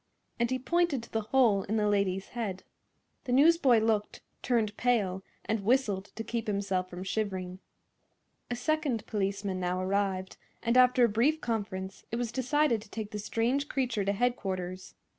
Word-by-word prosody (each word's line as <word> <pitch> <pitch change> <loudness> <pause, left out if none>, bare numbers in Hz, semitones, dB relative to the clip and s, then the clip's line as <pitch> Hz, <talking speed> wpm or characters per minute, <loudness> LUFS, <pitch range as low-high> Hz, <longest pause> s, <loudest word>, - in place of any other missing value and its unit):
and 235 0 +2
he 260 - 0
pointed 320 -1 +1
to - - -13
the 225 - 0
hole 235 -7 +4
in 215 +2 -1
the 210 -1 +2
lady's 195 -2 0
head. 205 -6 -4 0.6
The 250 - -3
newsboy 280 -2 +5
looked, 215 -2 0 0.2
turned 225 -4 +1
pale 205 -7 +1 0.2
and 220 -2 -1
whistled 210 -4 +2
to 225 - -4
keep 230 -1 -3
himself 195 -3 -1
from 180 +1 -7
shivering. 190 -3 -3 0.9
A 245 - -1
second 290 -5 -1
policeman 195 -2 -2
now 180 0 -1
arrived, 190 0 -1 0.3
and 235 +1 +1
after 250 -1 +6
a - - +3
brief 240 +9 +2
conference 200 -6 -4
it - - -1
was 235 -1 -2
decided 260 -1 +1
to 210 - -15
take 215 -1 -5
the 210 - -4
strange 240 +7 0
creature 250 -6 0
to 200 +1 +1
headquarters. 190 -5 -2
220 Hz, 165 wpm, -30 LUFS, 195-245 Hz, 0.9 s, after